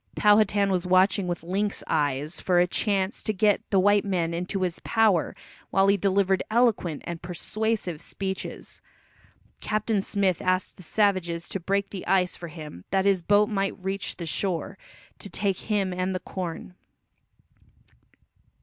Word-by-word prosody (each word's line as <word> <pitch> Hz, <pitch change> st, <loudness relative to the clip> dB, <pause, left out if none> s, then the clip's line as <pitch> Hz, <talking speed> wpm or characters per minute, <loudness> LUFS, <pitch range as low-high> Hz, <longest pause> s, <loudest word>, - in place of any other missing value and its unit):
Powhatan 205 Hz, -1 st, +4 dB
was 180 Hz, -1 st, 0 dB
watching 185 Hz, +1 st, +3 dB
with 175 Hz, -2 st, -3 dB
lynx 200 Hz, +4 st, -2 dB
eyes 145 Hz, +1 st, -1 dB
for 180 Hz, -2 st, +3 dB
a 175 Hz, -, +5 dB
chance 195 Hz, +1 st, 0 dB
to 215 Hz, -, -1 dB
get 205 Hz, 0 st, +2 dB
the 195 Hz, -, +3 dB
white 205 Hz, +1 st, +4 dB
men 175 Hz, -4 st, -1 dB
into 180 Hz, +3 st, -2 dB
his 175 Hz, -2 st, -2 dB
power 220 Hz, -7 st, +2 dB, 0.3 s
while 195 Hz, 0 st, +3 dB
he 200 Hz, -, +5 dB
delivered 195 Hz, -1 st, +2 dB
eloquent 220 Hz, -9 st, +1 dB
and 170 Hz, -1 st, -5 dB
persuasive 185 Hz, 0 st, -3 dB
speeches. 190 Hz, -1 st, -5 dB, 0.8 s
Captain 215 Hz, -1 st, 0 dB
Smith 195 Hz, -3 st, 0 dB
asked 185 Hz, 0 st, 0 dB
the -, -, -12 dB
savages 180 Hz, -3 st, 0 dB
to 195 Hz, -, -3 dB
break 195 Hz, +3 st, -1 dB
the 195 Hz, -, -7 dB
ice 180 Hz, -1 st, +2 dB
for 170 Hz, -, -8 dB
him 150 Hz, -, -9 dB
that 190 Hz, 0 st, +1 dB
his 195 Hz, -2 st, +3 dB
boat 205 Hz, +4 st, +4 dB
might 195 Hz, -2 st, -1 dB
reach 195 Hz, 0 st, -3 dB
the 170 Hz, -, -6 dB
shore, 185 Hz, +3 st, -1 dB, 0.4 s
to 200 Hz, -, -7 dB
take 195 Hz, -2 st, -1 dB
him 195 Hz, -3 st, +1 dB
and 185 Hz, +1 st, -2 dB
the -, -, -1 dB
corn. 180 Hz, -1 st, -6 dB
190 Hz, 155 wpm, -26 LUFS, 175-200 Hz, 0.8 s, a